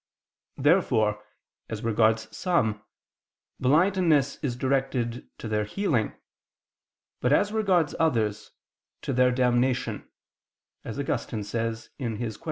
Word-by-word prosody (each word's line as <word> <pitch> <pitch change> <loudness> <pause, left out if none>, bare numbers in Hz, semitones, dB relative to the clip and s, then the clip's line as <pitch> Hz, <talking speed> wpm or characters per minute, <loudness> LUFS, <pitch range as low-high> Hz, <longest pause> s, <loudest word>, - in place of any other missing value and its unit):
Therefore 120 - +2 0.5
as 110 -1 -5
regards 110 0 +1
some, 110 - +1 0.8
blindness 155 0 +3
is 130 -5 -3
directed 130 -2 -1
to - - -6
their 105 -1 0
healing; 120 - 0 1.1
but 125 - +1
as 205 +8 +3
regards 190 -8 +2
others, 115 -10 0 0.5
to 135 - -2
their 125 0 +4
damnation; 125 -3 0 0.7
as - - -6
Augustine 105 - -2
says 115 +1 -3
(De 130 - -3
Quaest. 110 -2 -4
125 Hz, 105 wpm, -26 LUFS, 110-145 Hz, 1.1 s, their